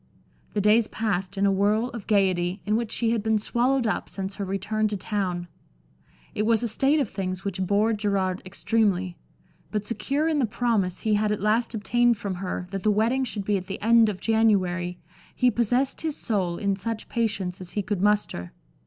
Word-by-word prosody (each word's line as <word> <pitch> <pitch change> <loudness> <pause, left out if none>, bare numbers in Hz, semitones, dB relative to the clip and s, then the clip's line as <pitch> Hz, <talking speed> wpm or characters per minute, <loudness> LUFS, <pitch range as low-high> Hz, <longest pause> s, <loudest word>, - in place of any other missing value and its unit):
The 205 - +2
days 210 +2 +4
passed 200 -3 -2
in 200 - +2
a 200 - +4
whirl 210 +5 +2
of 230 -4 -8
gaiety, 185 -2 +2
in 210 +1 +1
which 230 -1 -1
she 230 -1 +1
had 230 -2 +1
been 220 +1 +2
swallowed 245 +4 +1
up 215 - -1
since 195 0 -5
her 200 - -3
return 200 +3 -1
to 210 -1 -3
town. 185 -3 -2 0.9
It - - -1
was 225 +1 +2
a - - +1
state 275 +7 +2
of 275 - +1
things 190 -1 -4
which 190 -1 -3
bored 205 +3 +1
Gerard 195 -3 0
extremely, 190 -2 0 0.5
but 210 -1 -2
secure 275 +7 -1
in 315 -2 +1
the 250 - +2
promise 215 -5 0
he 220 - +1
had 210 0 +2
at 210 - -1
last 225 +4 +1
obtained 240 +2 +2
from 200 -1 -4
her 180 -1 -3
that 195 -1 -3
the 215 - +2
wedding 225 +6 +2
should 210 -5 -4
be 205 0 +2
at 185 -1 -7
the 195 - -5
end 230 0 +5
of 195 -3 -4
January 185 -6 +1 0.4
he 250 -1 +3
possessed 245 +4 +1
his 315 -2 -2
soul 185 -6 -1
in 200 +1 0
such 220 +3 -5
patience 205 -6 -2
as 180 -1 -6
he 205 - -1
could 200 -1 -2
muster. 205 - 0
210 Hz, 200 wpm, -25 LUFS, 190-230 Hz, 0.9 s, end